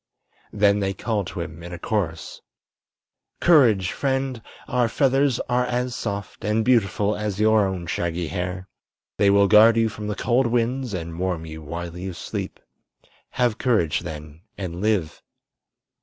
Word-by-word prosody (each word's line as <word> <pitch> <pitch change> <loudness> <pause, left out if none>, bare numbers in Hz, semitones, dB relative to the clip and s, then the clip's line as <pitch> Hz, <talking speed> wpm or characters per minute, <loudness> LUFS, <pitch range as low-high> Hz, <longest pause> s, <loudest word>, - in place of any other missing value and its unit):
Then 105 -1 +3
they 95 -1 -1
called 105 -5 -2
to 90 - -5
him 85 0 -7
in 85 +1 -8
a 90 - -6
chorus: 85 -6 -3 1.0
"Courage, 115 - +4
friend! 135 -3 -1 0.3
Our 120 -2 +1
feathers 135 0 +2
are 125 0 0
as 125 0 -2
soft 100 -3 -5
and 105 +2 +1
beautiful 105 -4 +2
as 105 -2 -3
your 110 -1 +4
own 95 -2 -4
shaggy 85 +1 -2
hair. 90 +3 -4 0.5
They 100 - +4
will 100 0 +5
guard 110 +2 +7
you 115 -1 +3
from 105 0 -7
the 105 - -2
cold 125 +5 +1
winds 120 0 -1
and 85 -1 -6
warm 90 -3 -2
you 80 0 -8
while 85 +3 -6
you 90 +1 -5
sleep. 85 - -6 0.7
Have 120 -4 +1
courage, 105 - +1
then, 75 -1 -9 0.2
and 90 -2 -5
live!" 100 -7 0
100 Hz, 155 wpm, -23 LUFS, 90-115 Hz, 1.0 s, guard